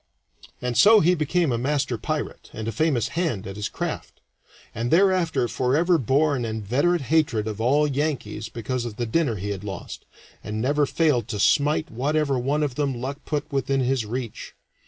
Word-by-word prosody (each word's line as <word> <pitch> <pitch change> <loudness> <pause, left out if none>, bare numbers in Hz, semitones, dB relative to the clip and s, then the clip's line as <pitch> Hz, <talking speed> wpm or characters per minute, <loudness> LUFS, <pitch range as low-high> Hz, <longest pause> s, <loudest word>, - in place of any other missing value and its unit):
And 125 -1 -1
so 215 - +7
he 175 +1 +4
became 165 -1 +1
a 120 - 0
master 135 -1 0
pirate, 150 +7 -4
and 110 0 -5
a - - -1
famous 120 -3 +1
hand 155 - -2
at 95 - -7
his 105 0 -3
craft, - - -5 0.5
and 115 +2 -2
thereafter 180 -6 +3
forever 160 +9 +2
bore 140 +4 +2
an 125 - -2
inveterate 120 - 0
hatred 125 -9 +2
of 110 0 -4
all 140 +6 +3
Yankees 135 -7 -2
because 120 +2 -3
of 115 -3 -6
the 120 - -2
dinner 125 0 +1
he 100 +1 -4
had 100 -1 -5
lost, 95 -3 -7 0.4
and 110 0 -4
never 145 +4 +1
failed 145 -10 +1
to 105 -2 -4
smite 150 +7 +2
whatever 140 +3 0
one 145 +5 0
of 145 -4 -1
them 135 -2 -1
luck 135 +3 -4
put 150 0 -3
within 135 0 0
his 130 -1 +1
reach. 115 +1 -6
130 Hz, 180 wpm, -24 LUFS, 115-150 Hz, 0.5 s, so